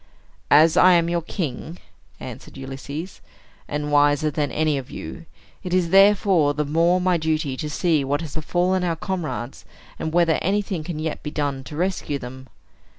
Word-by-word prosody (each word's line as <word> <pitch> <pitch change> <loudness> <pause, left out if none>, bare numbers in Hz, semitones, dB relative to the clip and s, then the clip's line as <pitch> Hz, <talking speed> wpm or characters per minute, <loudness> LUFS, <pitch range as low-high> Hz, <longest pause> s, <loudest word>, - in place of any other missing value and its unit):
"As 155 +2 +6
I 185 0 +7
am 170 -1 +3
your 170 0 0
king," 165 -1 -5 0.4
answered - - -9
Ulysses, 135 +6 -7 0.5
"and 150 0 -3
wiser 145 +1 +3
than 145 -1 -1
any 155 -2 +1
of 130 - -10
you, 170 -2 -8 0.3
it 180 0 -2
is 175 -2 +1
therefore 195 -6 +4
the 150 0 -1
more 165 +5 +2
my 180 -1 +2
duty 155 -4 -1
to 150 - -4
see 155 -1 +1
what 145 +3 -1
has 160 -3 -7
befallen 180 +4 0
our 170 -2 0
comrades, 160 -8 -4 0.4
and 160 - -3
whether 170 -1 +3
anything 195 -3 -1
can 165 0 -5
yet 155 0 -3
be 150 - -5
done 140 -3 -2
to 135 - -8
rescue 175 -4 -1
them. 130 0 -9
155 Hz, 170 wpm, -23 LUFS, 145-175 Hz, 0.5 s, I